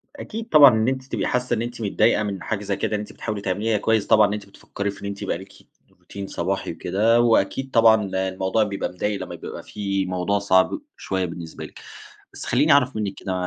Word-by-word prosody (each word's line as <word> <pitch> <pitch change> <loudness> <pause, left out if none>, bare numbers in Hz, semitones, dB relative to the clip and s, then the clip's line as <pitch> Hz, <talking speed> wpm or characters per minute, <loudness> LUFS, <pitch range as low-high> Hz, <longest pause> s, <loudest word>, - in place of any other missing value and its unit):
أكيد 225 -4 -7
طبعًا 145 - +9
إن 110 +2 +1
أنتِ 130 0 -1
تبقي - - -3
حاسَّة 125 0 0
إن 115 - 0
أنتِ 120 0 -5
متضايقة 105 0 +2
من 100 -4 -4
حاجة 105 -2 -3
زي 100 -1 -1
كده، 105 - -1
إن - - -1
أنتِ 105 - -8
بتحاولي 105 -2 -5
تعمليها 105 +3 0
كويِّس 110 0 +1
طبعًا، 110 -2 +6
إن 100 - -3
أنتِ 105 -1 -5
بتفكري 100 0 -5
في 100 - -14
إن - - -7
أنتِ 100 0 -5
يبقى 95 -4 -2
ليكِ 95 +1 -13 0.5
روتين 100 -1 -8
صباحي - - -3
وكده، 110 +6 +2
وأكيد 120 +3 +1
طبعًا 110 -2 +5
ال 95 - -5
الموضوع 95 +3 0
بيبقى 100 -2 -3
مضَايق 100 +3 -3
لمّا - - -6
بيبقى - - -8
في 100 -2 -2
موضوع 90 +2 -1
صعب 95 - +2 0.2
شويَّة 95 -1 -2
بالنسبة 85 -1 -7
لِك. - - -13 0.5
بس - - -8
خلّيني 145 +6 +2
أعرف 140 -2 +4
منِّك 105 -3 -2
كده، 95 - -4
105 Hz, 220 wpm, -23 LUFS, 95-115 Hz, 0.5 s, طبعًا